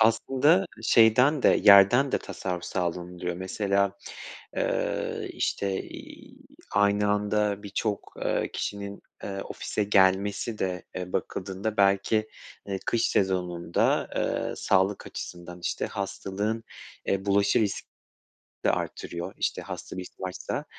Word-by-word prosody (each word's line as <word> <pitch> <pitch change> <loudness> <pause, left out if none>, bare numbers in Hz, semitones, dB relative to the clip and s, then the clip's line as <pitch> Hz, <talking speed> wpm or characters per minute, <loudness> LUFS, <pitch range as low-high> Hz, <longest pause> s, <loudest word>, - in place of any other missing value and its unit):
aslında 135 +10 +4 0.2
şeyden 125 +6 +5
de, - - +6 0.2
yerden 105 +7 +7
de - - +3
tasarruf 90 -2 -5
sağlanılıyor 90 0 -3
mesela. 100 +1 0 0.6
Eee, - - -1
işte, 100 -1 -1
iii, - - -11 0.4
aynı 100 0 +3
anda 105 0 0
birçok, 100 +1 -3
eee, - - 0
kişinin, 100 0 -4 0.2
eee, 95 -1 -4
ofise 105 - -3
gelmesi 100 +3 +2
de, 90 -2 -2
eee, 90 -1 -5
bakıldığında 100 +3 -3
belki, 100 +2 +3 0.4
eee, 100 -1 -2
kış 115 -1 +2
sezonunda, 90 -3 +1
eee, - - -1
sağlık 95 +1 +1
açısından, 90 0 -8
işte, - - -2
hastalığın, 100 +3 -3 0.4
eee, 95 0 0
bulaşı 100 +2 +3
risk 100 -3 -1 0.8
de - - +5
artırıyor, 85 +2 -4
işte, - - -1
hasta - - -7
risk 90 -1 -7
varsa. 95 -1 -4
100 Hz, 115 wpm, -27 LUFS, 95-105 Hz, 0.8 s, yerden